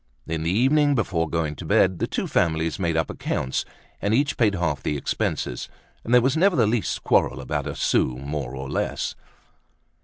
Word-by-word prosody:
In 80 -1 -3
the 80 - -1
evening 140 - +3
before 85 - 0
going 80 -3 -1
to - - -7
bed, 95 -2 +3
the - - 0
two - - -2
families 80 0 0
made 85 -3 0
up 80 - 0
accounts 65 - -2 0.4
and 100 +2 +2
each 140 +2 +1
paid 105 -4 +2
half 80 -6 -1
the 75 - -1
expenses; 60 -2 -2 0.3
and 115 - -5
there 125 0 +7
was 130 +2 +2
never 185 +3 +4
the 120 - +4
least 110 -3 -1
quarrel - - +2
about 65 - -3
a - - -4
sou 60 - +1
more 70 -1 -4
or 65 0 -5
less. - - -2
85 Hz, 190 wpm, -24 LUFS, 75-120 Hz, 0.4 s, there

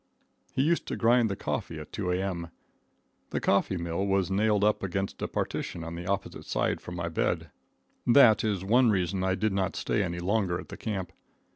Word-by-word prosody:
He 130 - +1
used 165 +3 +1
to - - -2
grind 120 0 +4
the 100 - -2
coffee - - -3
at - - -9
2 90 - -2
A.M. 90 -2 -2 0.8
The - - -1
coffee 100 -1 +2
mill 85 +2 -2
was 95 -1 +1
nailed 105 +1 +2
up 105 0 +3
against 95 0 -3
a - - -1
partition 85 - -3
on 85 0 -6
the 85 +1 -6
opposite 100 0 -3
side - - 0
from 90 - -7
my 85 -1 -3
bed. 80 - -1 0.6
That 120 -3 +7
is 100 -4 0
one 120 +5 +4
reason 95 -2 0
I 95 0 +1
did 105 +1 0
not 95 -1 0
stay - - 0
any 85 -3 -2
longer 90 -1 0
at - - -10
the - - -7
camp. 95 -5 -4
95 Hz, 195 wpm, -28 LUFS, 90-105 Hz, 0.8 s, That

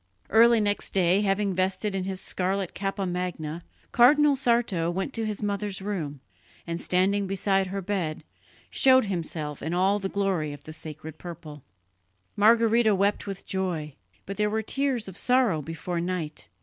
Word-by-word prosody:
Early 230 +1 +6
next 205 -1 -1
day, 185 +1 +3
having 200 -1 +1
vested 190 +3 -1
in 190 -1 -2
his 190 -1 -3
scarlet 190 0 -2
cappa 195 0 -2
magna, 175 -3 -3 0.3
Cardinal 290 +4 +5
Sarto 235 -10 +1
went 190 +9 -3
to 225 -1 -1
his 210 0 -4
mother's 205 -1 -2
room 170 -9 -4 0.4
and, 170 0 -4
standing 195 +2 +1
beside 195 0 +1
her 195 +1 -4
bed, 175 -5 -2 0.5
showed 260 -2 +5
himself 160 -6 -3
in 160 +3 -2
all 195 +3 +2
the 195 -1 -3
glory 190 -7 -1
of 145 0 -11
the 155 - -8
"sacred 155 0 -9
purple." 155 -4 -9 0.7
Margherita 225 0 +4
wept 200 +2 0
with 195 -1 -6
joy; 175 -6 -3 0.3
but 195 - -6
there 210 0 +1
were 220 +1 -1
tears 270 -2 0
of 190 -1 -7
sorrow 245 -11 +3
before 165 +3 -4
night. 175 -4 -4
195 Hz, 160 wpm, -26 LUFS, 170-210 Hz, 0.7 s, Early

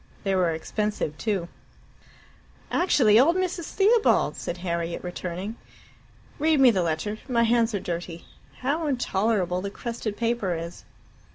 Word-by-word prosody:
They 195 -2 0
were 185 -2 +2
expensive 165 +1 -2
too. 200 -6 -1 1.2
"Actually 240 - +4
old 320 +7 +5
Mrs. 365 -2 -1
Theobald!" 430 +6 +3
said 175 - -5
Harriet, 170 -1 -3
returning. 180 +4 -5 0.8
"Read 310 0 +3
me 260 -2 +7
the 190 -4 +1
letter. 170 +6 -2
My 235 -2 +3
hands 230 -1 +2
are - - 0
dirty. 170 -1 -5 0.4
How 300 +5 0
intolerable 200 -8 0
the 200 - -3
crested 230 -1 -5
paper 230 -6 0
is." 165 +1 -7
210 Hz, 130 wpm, -25 LUFS, 175-245 Hz, 1.2 s, me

